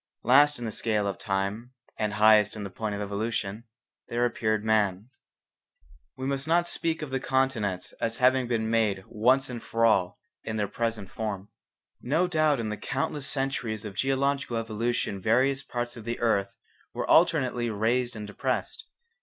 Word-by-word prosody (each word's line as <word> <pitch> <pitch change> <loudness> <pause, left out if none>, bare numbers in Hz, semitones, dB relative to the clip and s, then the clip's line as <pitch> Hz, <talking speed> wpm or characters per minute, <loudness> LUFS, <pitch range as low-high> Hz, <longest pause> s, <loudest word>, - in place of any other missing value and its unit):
Last 145 +4 +5
in 120 - -5
the 110 - -3
scale 105 -2 0
of 100 -2 -3
time 100 +4 -2 0.2
and 105 -1 -2
highest 110 -1 +5
in 105 -2 -5
point 105 +1 -3
of 100 - -4
evolution, 105 +1 -3 0.4
there 120 +1 0
appeared 110 -3 0
man. 105 0 +1 1.1
We 130 - -4
must 135 +1 -1
not 170 +1 +3
speak 165 -2 -1
of 145 - -6
the 135 - 0
continents 120 -9 -1
as 115 0 0
having 130 0 +3
been 115 -2 0
made 110 -4 +1
once 130 +5 +2
and 120 -2 -6
for 115 0 0
all 95 -5 +2 0.2
in 110 - -4
their 105 -2 0
present 110 -2 -3
form. 105 -3 -4 0.5
No 155 +8 +1
doubt 155 -5 +2
in 110 -2 -2
the 105 - -3
countless 135 +1 -3
centuries 125 -6 -2
of 105 - -6
geological 135 +1 0
evolution 115 -2 -2
various 130 +6 +2
parts 120 -3 -4
of 115 - -9
the 120 +1 -4
earth 100 -4 0 0.4
were - - -2
alternately 120 -2 +3
raised 120 +3 0
and 105 -1 -6
depressed. 130 - -3
115 Hz, 165 wpm, -27 LUFS, 105-130 Hz, 1.1 s, Last